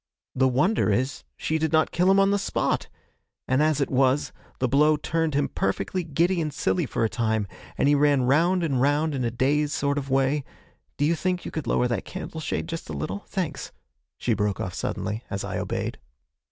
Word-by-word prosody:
The 130 Hz, 0 st, +3 dB
wonder 135 Hz, -, +2 dB
is 130 Hz, +7 st, -1 dB
she 160 Hz, 0 st, -1 dB
did 160 Hz, -1 st, 0 dB
not 160 Hz, -1 st, +3 dB
kill 180 Hz, +2 st, +2 dB
him 195 Hz, +1 st, +5 dB
on 195 Hz, 0 st, +4 dB
the 200 Hz, -, +2 dB
spot, 195 Hz, -, -1 dB, 0.6 s
and, 130 Hz, +2 st, +2 dB
as 155 Hz, -1 st, +2 dB
it 140 Hz, -, 0 dB
was, 135 Hz, +2 st, +2 dB, 0.2 s
the 130 Hz, -, +1 dB
blow 150 Hz, +4 st, +4 dB
turned 160 Hz, 0 st, -1 dB
him 145 Hz, 0 st, +2 dB
perfectly 175 Hz, -, -1 dB
giddy 170 Hz, +3 st, +1 dB
and 155 Hz, -1 st, -2 dB
silly 170 Hz, +2 st, 0 dB
for -, -, -1 dB
a -, -, +4 dB
time, 110 Hz, -2 st, 0 dB, 0.3 s
and -, -, +2 dB
he 145 Hz, -, +5 dB
ran 145 Hz, -2 st, +3 dB
round 170 Hz, +8 st, +3 dB
and 135 Hz, -6 st, +1 dB
round 145 Hz, +3 st, +2 dB
in 130 Hz, -2 st, -1 dB
a 120 Hz, -, +1 dB
dazed 145 Hz, +5 st, +1 dB
sort 140 Hz, 0 st, 0 dB
of 140 Hz, -1 st, -7 dB
way 135 Hz, +2 st, +2 dB, 0.5 s
do 145 Hz, -, +2 dB
you 160 Hz, -, +3 dB
think 180 Hz, +1 st, -1 dB
you -, -, -5 dB
could 155 Hz, -6 st, -4 dB
lower 125 Hz, -, +2 dB
that 120 Hz, -, -2 dB
candle 185 Hz, -3 st, -7 dB
shade -, -, -2 dB
just 165 Hz, -, -6 dB
a -, -, -4 dB
little? 85 Hz, +8 st, -4 dB
Thanks!' 180 Hz, -6 st, -3 dB, 0.5 s
she -, -, 0 dB
broke 105 Hz, -1 st, -1 dB
off 90 Hz, -, -3 dB
suddenly, 105 Hz, +4 st, -3 dB
as 100 Hz, -, -3 dB
I -, -, -3 dB
obeyed. -, -, -3 dB
145 Hz, 210 wpm, -25 LUFS, 125-160 Hz, 0.6 s, him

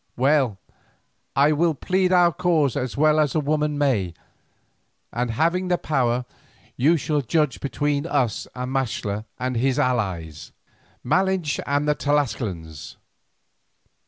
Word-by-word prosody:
Well, 135 Hz, -5 st, +2 dB, 0.8 s
I 140 Hz, +2 st, +4 dB
will 160 Hz, +1 st, +2 dB
plead 185 Hz, +6 st, 0 dB
our 175 Hz, -2 st, +5 dB
cause 165 Hz, -7 st, +1 dB
as 125 Hz, 0 st, -3 dB
well 155 Hz, +1 st, +4 dB
as 150 Hz, -4 st, +1 dB
a -, -, +3 dB
woman 150 Hz, 0 st, 0 dB
may, 110 Hz, -, 0 dB, 1.0 s
and 125 Hz, 0 st, -1 dB
having 170 Hz, +10 st, 0 dB
the 180 Hz, -1 st, +2 dB
power, 125 Hz, -6 st, 0 dB, 0.5 s
you 155 Hz, +7 st, +3 dB
shall 150 Hz, 0 st, -1 dB
judge 150 Hz, +1 st, 0 dB
between 145 Hz, +2 st, -1 dB
us 130 Hz, -, 0 dB
and 125 Hz, 0 st, -4 dB
Maxtla 110 Hz, -5 st, -2 dB
and 130 Hz, 0 st, -2 dB
his 130 Hz, +2 st, +1 dB
allies, 95 Hz, -11 st, -2 dB, 0.5 s
Malinche 185 Hz, +1 st, +1 dB
and 145 Hz, +1 st, 0 dB
the 150 Hz, -, +4 dB
Tlascalans. 110 Hz, -, -2 dB
140 Hz, 130 wpm, -23 LUFS, 125-155 Hz, 1.0 s, our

